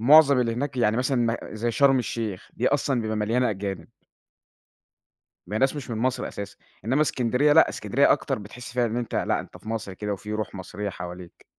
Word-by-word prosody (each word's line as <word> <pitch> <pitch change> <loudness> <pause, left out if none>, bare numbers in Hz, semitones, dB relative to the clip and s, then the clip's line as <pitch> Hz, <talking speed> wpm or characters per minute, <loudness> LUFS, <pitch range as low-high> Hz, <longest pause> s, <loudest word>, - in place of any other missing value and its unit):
مُعظَم 140 +1 +7
اللي 115 -2 +1
هناك 135 +3 -3
يعني 110 -3 +2
مثلًا 130 +2 +1 0.2
م - - -1 0.2
زي 115 +2 -1
شرم 135 +2 +4
الشيخ، 110 -5 -4
دي 125 - +1
أصلًا 140 -3 +1
بيبقى 110 -1 -2
مليانة 115 +4 +1
أجانب. 100 -1 -4 1.6
ما 105 - -3
هي - - +1
ناس 135 +2 +2
مش 140 -4 -6
من 110 - -3
مصر 125 +2 0
أساسًا، 100 0 -7 0.3
إنما 130 +7 +3
إسكندرية، 130 +1 +2
لأ، 160 - +7
إسكندرية - - +2
أكتر، - - -1
بتحِس 120 +4 -9
فيها 125 -1 +2
إن 115 +1 -3
أنت 120 -2 -3
لأ، - - +1
أنت - - -12
في - - -12
مصر 110 -3 -3
كده 105 +2 -3
وفي 105 +2 -6
رُوح 105 -1 -3
مصرية 100 +2 -5
حواليك. 90 -1 -9
115 Hz, 200 wpm, -25 LUFS, 105-130 Hz, 1.6 s, مُعظَم